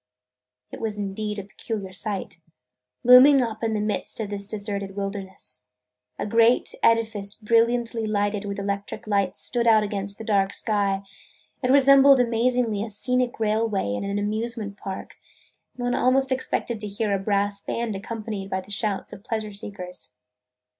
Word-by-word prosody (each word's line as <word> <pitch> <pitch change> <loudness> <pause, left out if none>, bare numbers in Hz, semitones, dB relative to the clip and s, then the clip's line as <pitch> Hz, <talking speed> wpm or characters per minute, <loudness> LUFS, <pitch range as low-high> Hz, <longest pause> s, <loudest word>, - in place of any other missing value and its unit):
It - - -8
was 220 -2 -3
indeed 210 +1 -3
a 200 - -4
peculiar 200 -1 -6
sight, 195 -3 -4 0.6
looming 255 +3 +8
up 230 -2 -2
in 225 -1 0
the - - 0
midst 210 +1 -2
of 210 -2 -3
this 200 -1 -3
deserted 200 -2 -4
wilderness. 195 -9 -6 0.6
A - - -3
great 230 +3 +3
edifice 220 -3 +2
brilliantly 230 0 +1
lighted 205 -1 0
with 200 -1 -4
electric 200 +1 -4
lights 200 -3 0
stood 235 -1 +1
out 220 -2 +6
against 200 -1 -4
the - - -7
dark 200 -3 +1
sky. 200 -2 0 0.6
It 250 - 0
resembled 275 0 +7
amazingly 235 -2 +1
a 225 - -5
scenic 250 +3 0
railway 215 - 0
in 105 - -3
an 200 0 -2
amusement 215 0 -3
park, 195 -1 -7 0.6
and 245 - -6
one 245 0 0
almost 265 +1 +2
expected 250 -3 -1
to 210 - -4
hear 205 +1 -2
a 195 - +1
brass 200 0 0
band 230 -1 -3
accompanied 210 -1 -5
by 190 -1 -2
the 200 - -14
shouts 205 -1 -2
of 195 - -11
pleasure 215 -2 -3
seekers. 200 - -8
210 Hz, 160 wpm, -24 LUFS, 200-230 Hz, 0.6 s, looming